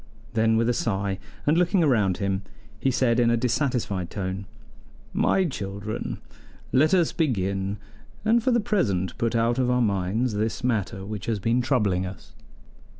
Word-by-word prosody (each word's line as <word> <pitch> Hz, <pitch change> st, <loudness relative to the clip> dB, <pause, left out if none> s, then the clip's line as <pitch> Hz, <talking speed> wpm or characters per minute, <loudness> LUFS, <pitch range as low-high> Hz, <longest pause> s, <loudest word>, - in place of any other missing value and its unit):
Then 110 Hz, 0 st, +3 dB
with 115 Hz, 0 st, +2 dB
a 120 Hz, -, +3 dB
sigh, 100 Hz, -4 st, -1 dB, 0.3 s
and 150 Hz, -, +4 dB
looking 180 Hz, +1 st, +3 dB
round 105 Hz, -10 st, +2 dB
him, 100 Hz, -1 st, -1 dB, 0.4 s
he 135 Hz, -, +1 dB
said 125 Hz, -2 st, +2 dB
in 120 Hz, -1 st, +4 dB
a 120 Hz, -, +3 dB
dissatisfied 115 Hz, -, -1 dB
tone: 95 Hz, -1 st, -4 dB, 0.7 s
"My 190 Hz, -, +2 dB
children, 105 Hz, -, -4 dB, 0.5 s
let 155 Hz, +7 st, +4 dB
us 175 Hz, -3 st, +3 dB
begin, 100 Hz, -, -1 dB, 0.5 s
and 230 Hz, +2 st, +4 dB
for 260 Hz, -, +1 dB
the 240 Hz, -1 st, +3 dB
present 105 Hz, -, 0 dB
put 115 Hz, 0 st, 0 dB
out 115 Hz, +2 st, +2 dB
of 125 Hz, -1 st, +2 dB
our 125 Hz, 0 st, +2 dB
minds 105 Hz, +2 st, 0 dB
this 110 Hz, +4 st, -2 dB
matter 105 Hz, -5 st, -1 dB
which 105 Hz, -1 st, -6 dB
has 115 Hz, -2 st, 0 dB
been 115 Hz, +5 st, +1 dB
troubling 105 Hz, -8 st, +1 dB
us." 95 Hz, -, -11 dB
115 Hz, 160 wpm, -25 LUFS, 100-130 Hz, 0.7 s, and